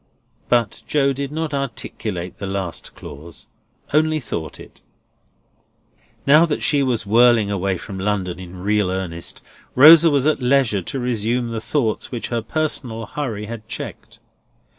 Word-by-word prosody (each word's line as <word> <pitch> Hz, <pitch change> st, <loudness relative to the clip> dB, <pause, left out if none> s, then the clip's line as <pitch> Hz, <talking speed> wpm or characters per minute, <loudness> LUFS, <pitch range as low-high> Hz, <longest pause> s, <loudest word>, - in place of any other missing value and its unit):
But 120 Hz, -2 st, +1 dB
Joe 140 Hz, -2 st, +2 dB
did 140 Hz, +1 st, -4 dB
not 160 Hz, -1 st, -3 dB
articulate 110 Hz, -9 st, -4 dB
the 100 Hz, -, -4 dB
last 95 Hz, -3 st, -5 dB
clause; 80 Hz, +2 st, -11 dB, 0.5 s
only 155 Hz, +1 st, +3 dB
thought 85 Hz, -, -6 dB
it. -, -, -14 dB, 1.4 s
Now 150 Hz, +4 st, +7 dB
that 150 Hz, -, -2 dB
she 145 Hz, -3 st, +3 dB
was 125 Hz, -5 st, 0 dB
whirling 115 Hz, -1 st, +4 dB
away 95 Hz, -1 st, -1 dB
for 100 Hz, -, -9 dB
London 95 Hz, -2 st, -2 dB
in 90 Hz, 0 st, -9 dB
real 105 Hz, -1 st, +1 dB
earnest, 90 Hz, -3 st, -5 dB, 0.3 s
Rosa 160 Hz, +5 st, +9 dB
was 140 Hz, -2 st, +2 dB
at 155 Hz, -3 st, +2 dB
leisure 125 Hz, -5 st, +2 dB
to 135 Hz, +9 st, -5 dB
resume 120 Hz, 0 st, -1 dB
the 110 Hz, -1 st, -4 dB
thoughts 115 Hz, -2 st, -1 dB
which 120 Hz, -3 st, -4 dB
her 120 Hz, -1 st, -1 dB
personal 120 Hz, -4 st, -2 dB
hurry 110 Hz, -4 st, -4 dB
had 110 Hz, 0 st, -8 dB
checked. -, -, -7 dB
115 Hz, 145 wpm, -21 LUFS, 100-140 Hz, 1.4 s, Rosa